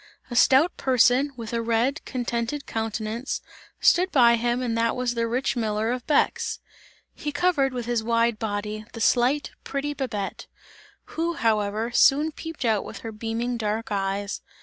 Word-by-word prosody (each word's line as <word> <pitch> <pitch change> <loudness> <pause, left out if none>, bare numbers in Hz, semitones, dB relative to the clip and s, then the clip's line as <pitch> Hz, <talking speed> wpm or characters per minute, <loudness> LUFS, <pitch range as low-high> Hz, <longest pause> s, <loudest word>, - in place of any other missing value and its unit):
A - - -3
stout 275 +7 +5
person, 255 +2 +3
with 230 -1 -6
a 230 - 0
red, 235 +6 0
contented 245 +2 -3
countenance, 225 +3 -3 0.4
stood 365 +2 +4
by 235 -3 +6
him 240 +1 0
and 235 -2 -1
that 230 0 +1
was 250 -1 -1
the 230 -1 -1
rich 250 +4 -1
miller 220 -1 0
of 250 -1 -4
Bex. 455 +9 +1 0.6
He 295 - -4
covered 285 -3 +2
with 245 -2 -4
his 235 -2 0
wide 230 -1 +1
body, 210 0 -3
the 230 - -7
slight 250 +5 +2
pretty 280 +1 -3
Babette, 220 -9 -4 0.7
who 335 +1 -1
however, 220 -1 0
soon 290 +5 +4
peeped 325 -3 -6
out 220 -3 +2
with - - -9
her 225 - -4
beaming 225 +3 -3
dark 220 0 -2
eyes. 200 0 -2
235 Hz, 160 wpm, -25 LUFS, 225-270 Hz, 0.7 s, by